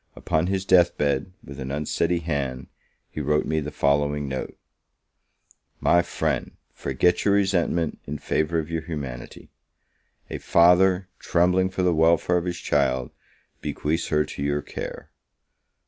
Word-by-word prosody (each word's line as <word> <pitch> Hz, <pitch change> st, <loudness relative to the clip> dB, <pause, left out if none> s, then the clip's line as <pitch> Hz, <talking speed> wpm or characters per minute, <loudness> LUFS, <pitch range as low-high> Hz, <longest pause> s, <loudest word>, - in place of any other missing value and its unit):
Upon 80 Hz, +2 st, 0 dB
his 95 Hz, 0 st, -1 dB
death 90 Hz, -2 st, +4 dB
bed, 70 Hz, +5 st, 0 dB
with 70 Hz, +1 st, -10 dB
an 65 Hz, 0 st, -5 dB
unsteady 80 Hz, +4 st, -1 dB
hand, 70 Hz, -6 st, -3 dB, 0.4 s
he 75 Hz, -, -4 dB
wrote 75 Hz, +1 st, +1 dB
me 80 Hz, 0 st, 0 dB
the 75 Hz, -1 st, -4 dB
following 75 Hz, 0 st, +1 dB
note: 65 Hz, -1 st, -5 dB, 1.2 s
"My 85 Hz, 0 st, +4 dB
friend, -, -, -2 dB, 0.2 s
forget 85 Hz, +6 st, +1 dB
your 100 Hz, -1 st, +3 dB
resentment, 90 Hz, -4 st, +1 dB
in 75 Hz, +1 st, -4 dB
favour 80 Hz, +3 st, -1 dB
of 80 Hz, 0 st, -3 dB
your 80 Hz, -1 st, -1 dB
humanity; 70 Hz, -7 st, -7 dB, 0.8 s
a -, -, -5 dB
father, 90 Hz, +2 st, +4 dB
trembling 90 Hz, +2 st, +2 dB
for 95 Hz, 0 st, -2 dB
the 90 Hz, -1 st, +3 dB
welfare 85 Hz, +2 st, +3 dB
of 85 Hz, -, -2 dB
his 90 Hz, -1 st, -3 dB
child, 65 Hz, -6 st, 0 dB, 0.5 s
bequeaths 80 Hz, +3 st, -2 dB
her 75 Hz, -1 st, +2 dB
to -, -, -8 dB
your 70 Hz, 0 st, -1 dB
care. -, -, -7 dB
80 Hz, 145 wpm, -24 LUFS, 70-90 Hz, 1.2 s, death